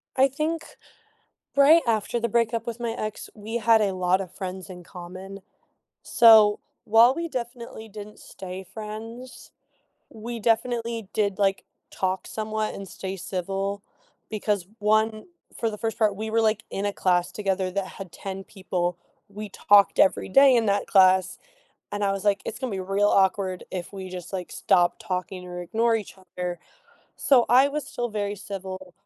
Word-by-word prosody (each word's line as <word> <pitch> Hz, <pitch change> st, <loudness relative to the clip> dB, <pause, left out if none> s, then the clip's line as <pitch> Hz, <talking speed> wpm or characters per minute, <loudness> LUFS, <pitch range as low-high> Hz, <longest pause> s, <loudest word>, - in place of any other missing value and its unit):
I 265 Hz, +1 st, +5 dB
think, 310 Hz, +4 st, -2 dB, 0.9 s
right 305 Hz, +4 st, +7 dB
after 225 Hz, +1 st, 0 dB
the 235 Hz, -, 0 dB
breakup 230 Hz, 0 st, 0 dB
with 235 Hz, 0 st, -5 dB
my 235 Hz, -, -1 dB
ex, 215 Hz, -2 st, -5 dB
we 220 Hz, +2 st, -6 dB
had 225 Hz, -1 st, +4 dB
a 200 Hz, -2 st, +1 dB
lot 185 Hz, +1 st, +2 dB
of 185 Hz, -2 st, -7 dB
friends 190 Hz, 0 st, -6 dB
in 180 Hz, -1 st, -9 dB
common, 185 Hz, +2 st, -9 dB, 0.6 s
so, 220 Hz, -3 st, +6 dB, 0.3 s
while 230 Hz, +3 st, +6 dB
we 335 Hz, +3 st, -3 dB
definitely 235 Hz, -4 st, -6 dB
didn't 210 Hz, 0 st, -10 dB
stay 185 Hz, 0 st, -8 dB
friends, 220 Hz, +5 st, -9 dB, 0.6 s
we 230 Hz, +2 st, -7 dB
definitely 230 Hz, -1 st, 0 dB
did, 200 Hz, -3 st, 0 dB
like, 195 Hz, -1 st, +1 dB, 0.3 s
talk 185 Hz, 0 st, -2 dB
somewhat 215 Hz, 0 st, -3 dB
and 195 Hz, -1 st, -8 dB
stay 190 Hz, +1 st, -6 dB
civil 195 Hz, +2 st, -3 dB, 0.5 s
because 210 Hz, -3 st, -1 dB
1, 215 Hz, +1 st, +1 dB, 0.3 s
for 230 Hz, -, 0 dB
the 210 Hz, -, -7 dB
first 225 Hz, +1 st, -3 dB
part, 215 Hz, -3 st, +2 dB
we 220 Hz, +2 st, -4 dB
were, 225 Hz, -, +1 dB
like, 215 Hz, -1 st, +1 dB
in 200 Hz, +1 st, -2 dB
a 205 Hz, -, -1 dB
class 180 Hz, -1 st, +1 dB
together 195 Hz, -2 st, -1 dB
that 195 Hz, 0 st, -2 dB
had 190 Hz, -3 st, -10 dB
10 195 Hz, 0 st, -6 dB
people. 180 Hz, -3 st, -3 dB, 0.3 s
We 205 Hz, +1 st, -8 dB
talked 200 Hz, +1 st, +4 dB
every 190 Hz, -, +3 dB
day 270 Hz, +4 st, +6 dB
in 230 Hz, -, +3 dB
that 200 Hz, 0 st, +1 dB
class, 185 Hz, -1 st, +4 dB, 0.5 s
and 205 Hz, 0 st, -2 dB
I 195 Hz, -, +2 dB
was 195 Hz, +1 st, -4 dB
like, 200 Hz, -1 st, +2 dB
"It's -, -, -5 dB
gonna 260 Hz, -, -3 dB
be 195 Hz, -, -3 dB
real 195 Hz, +2 st, +1 dB
awkward 190 Hz, -1 st, +1 dB
if 180 Hz, +1 st, -5 dB
we 190 Hz, -1 st, -7 dB
just, 180 Hz, 0 st, -8 dB
like, 185 Hz, -2 st, -4 dB
stop 175 Hz, 0 st, +2 dB
talking 185 Hz, 0 st, -4 dB
or 180 Hz, 0 st, -6 dB
ignore 225 Hz, +6 st, +1 dB
each 215 Hz, -3 st, -5 dB
other." 180 Hz, -2 st, -6 dB, 0.6 s
So, 255 Hz, -4 st, +4 dB
I 260 Hz, +4 st, +6 dB
was 300 Hz, +1 st, -4 dB
still 240 Hz, 0 st, -3 dB
very 205 Hz, -2 st, -3 dB
civil. 190 Hz, -2 st, -7 dB
205 Hz, 170 wpm, -25 LUFS, 190-225 Hz, 0.9 s, right